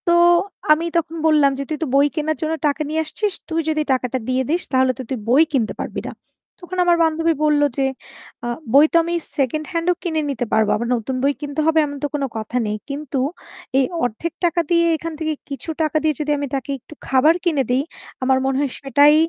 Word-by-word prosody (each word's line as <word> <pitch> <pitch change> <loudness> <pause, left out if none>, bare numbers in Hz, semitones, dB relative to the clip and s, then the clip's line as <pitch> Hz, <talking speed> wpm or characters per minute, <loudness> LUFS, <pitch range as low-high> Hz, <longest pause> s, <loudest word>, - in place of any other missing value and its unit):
তো - - +4 0.6
আমি 315 +2 +4
তখন 330 0 -1
বললাম 300 -3 +5
যে - - -1
"তুই 310 - -2
তো - - -2
বই 280 +1 +5
কেনার 310 -1 -1
জন্য 315 0 0
টাকা 290 +2 -1
নিয়ে 315 +1 0
আসছিস, 400 +6 -1 0.2
তুই 325 0 0
যদি 310 -1 0
এই - - -19
টাকাটা 255 0 -1
দিয়ে 255 0 +1
দিস 340 +3 +1
তাহলে 260 -1 +3
তো - - -2
তুই 265 - -2
বই 265 +7 +6
কিনতে 235 -6 +1
পারবি - - -4
না।" - - -4 0.5
তখন 370 0 -7
আমার 345 -1 +4
বান্ধবী 325 +1 +2
বলল 300 -1 +3 0.2
যে 270 - +2 0.6
আ - - -2 0.3
"বই 285 +2 +8
তো - - 0
আমি 340 +1 -3 0.2
সেকেন্ড 295 +3 0
হ্যান্ড 335 -1 -2
ও - - +3
কিনে 320 -4 0
নিতে 250 -3 -2
পারবো। 220 -1 +3
আবার 235 +2 -2
নতুন 240 +3 -3
বই 280 +1 +3
কিনতে 290 +1 -4
হবে 320 0 +4
এমন 285 -1 -6
তো - - +2
কোনো 280 -2 -1
কথা 220 +3 -3
নেই। 210 0 -2
কিন্তু 280 -1 -4 0.6
এই 270 - +4 0.2
অর্ধেক 245 +8 -2
টাকা 345 0 +2
দিয়ে 335 -1 +4
এইখান 325 +1 -5
থেকে 315 -1 -1 0.2
কিছু 280 +3 -6
টাকা 310 0 +1
দিয়ে 310 -1 +2
যদি 300 0 -1
আমি 285 0 -2
তাকে 270 +1 -3
একটু 280 - -14
খাবার 270 +5 +5
কিনে 310 -6 +2
দে, 250 - +3
ই - - -4 0.4
আমার 260 0 +3
মনে 270 0 +1
হয় 285 -2 0
সেটাই 285 +2 +5
295 Hz, 225 wpm, -20 LUFS, 270-320 Hz, 0.6 s, বই